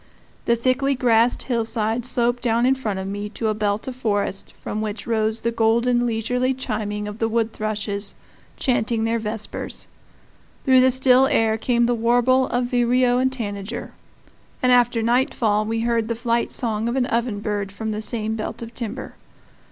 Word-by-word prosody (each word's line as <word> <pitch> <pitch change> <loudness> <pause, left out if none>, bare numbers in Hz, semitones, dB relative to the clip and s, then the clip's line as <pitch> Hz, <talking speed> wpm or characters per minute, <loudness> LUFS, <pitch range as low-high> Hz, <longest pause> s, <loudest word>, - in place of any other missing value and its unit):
The 235 - +3
thickly 260 +3 +1
grassed 240 -1 +3
hillside 230 -1 -1
sloped 245 -1 +1
down 235 0 +2
in 260 - +4
front 220 -7 -3
of 190 0 -4
me 205 +1 -4
to 225 - -1
a - - +1
belt 210 +1 -1
of 260 - -4
forest 205 -5 -1
from 215 - -4
which 215 0 -4
rose 220 -1 0
the 235 - 0
golden, 235 +2 +2
leisurely 250 +3 0
chiming 210 -4 -3
of 210 +1 -7
the 225 - +1
wood 225 0 0
thrushes, 205 -1 -3 0.4
chanting 230 -3 0
their 230 +1 0
vespers; 215 0 -5 0.8
through 260 -2 +6
the 260 - +5
still 260 0 +5
air 225 -3 +2
came 235 +1 +1
the 245 - +2
warble 245 +3 +3
of 245 0 0
vireo 245 0 +3
and 260 0 +2
tanager; 210 -2 -5 0.7
and 250 - +4
after 245 -2 +3
nightfall 230 -3 +1
we 225 +1 -1
heard 230 -1 0
the 230 - -1
flight 235 0 0
song 225 -1 0
of 240 - -2
an 260 -2 +2
ovenbird 210 -4 -1
from 220 +2 -4
the 215 0 -3
same 220 -1 -1
belt 220 +1 -4
of 230 0 -9
timber. 235 +2 -6
230 Hz, 175 wpm, -22 LUFS, 215-245 Hz, 0.8 s, through